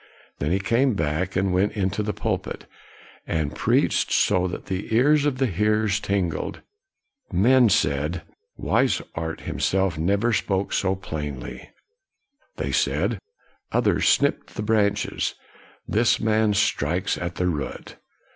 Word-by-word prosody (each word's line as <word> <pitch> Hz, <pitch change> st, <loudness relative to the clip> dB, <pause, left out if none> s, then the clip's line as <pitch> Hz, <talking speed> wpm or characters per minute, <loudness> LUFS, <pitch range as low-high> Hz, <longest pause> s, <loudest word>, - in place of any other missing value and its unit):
Then 75 Hz, +3 st, -1 dB
he 95 Hz, -, +3 dB
came 115 Hz, +5 st, +2 dB
back, 80 Hz, +3 st, -1 dB
and 95 Hz, -1 st, +1 dB
went 95 Hz, +3 st, +2 dB
into 100 Hz, 0 st, -1 dB
the 105 Hz, 0 st, -1 dB
pulpit, -, -, -3 dB, 0.6 s
and 80 Hz, -3 st, -1 dB
preached -, -, +1 dB
so 90 Hz, 0 st, +3 dB
that 90 Hz, -, -6 dB
the 95 Hz, +4 st, -4 dB
ears 145 Hz, +4 st, +4 dB
of 135 Hz, -3 st, -1 dB
the 135 Hz, -, +2 dB
hearers 105 Hz, 0 st, +1 dB
tingled. 95 Hz, -4 st, -2 dB, 0.7 s
Men 120 Hz, +6 st, +5 dB
said, 75 Hz, 0 st, 0 dB, 0.2 s
" -, -, -53 dB
Wishart 80 Hz, -1 st, -1 dB
himself 95 Hz, -4 st, 0 dB
never 100 Hz, +8 st, +1 dB
spoke 100 Hz, -2 st, -1 dB
so 95 Hz, 0 st, +1 dB
plainly.' 75 Hz, -8 st, -6 dB, 1.0 s
1 -, -, -3 dB
They -, -, -2 dB
said, -, -, 0 dB, 0.3 s
" -, -, -38 dB
Others -, -, +2 dB
snipped 140 Hz, 0 st, +1 dB
the 105 Hz, -, -3 dB
branches; 105 Hz, -2 st, 0 dB, 0.5 s
this 115 Hz, +2 st, +2 dB
man 110 Hz, -1 st, +2 dB
strikes 90 Hz, +1 st, +1 dB
at 85 Hz, -1 st, -5 dB
the 90 Hz, -, -1 dB
root. 75 Hz, -6 st, -4 dB
95 Hz, 135 wpm, -24 LUFS, 85-110 Hz, 1.0 s, Men